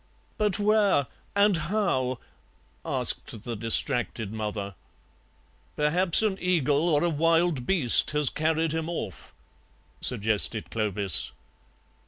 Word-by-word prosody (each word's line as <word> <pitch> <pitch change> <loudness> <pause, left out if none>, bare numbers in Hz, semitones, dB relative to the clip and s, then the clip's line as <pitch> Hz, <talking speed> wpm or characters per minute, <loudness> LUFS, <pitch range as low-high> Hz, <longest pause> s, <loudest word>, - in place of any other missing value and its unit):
"But 210 -2 0
where? 205 -7 +2 0.3
And 200 -1 +3
how?" 155 - -1 0.7
asked 110 - -2
the 120 - -5
distracted 115 -1 +1
mother. 105 -2 -5 1.0
"Perhaps 170 +6 +5
an 200 -3 -1
eagle 165 -3 +1
or 150 -1 +2
a 175 - +2
wild 165 -3 +1
beast 160 -12 +2
has 150 -3 +1
carried 160 0 -1
him 160 +1 -3
off," 110 - -6 0.7
suggested 110 -1 +1
Clovis. 100 -6 -1
150 Hz, 105 wpm, -26 LUFS, 115-175 Hz, 1.0 s, Perhaps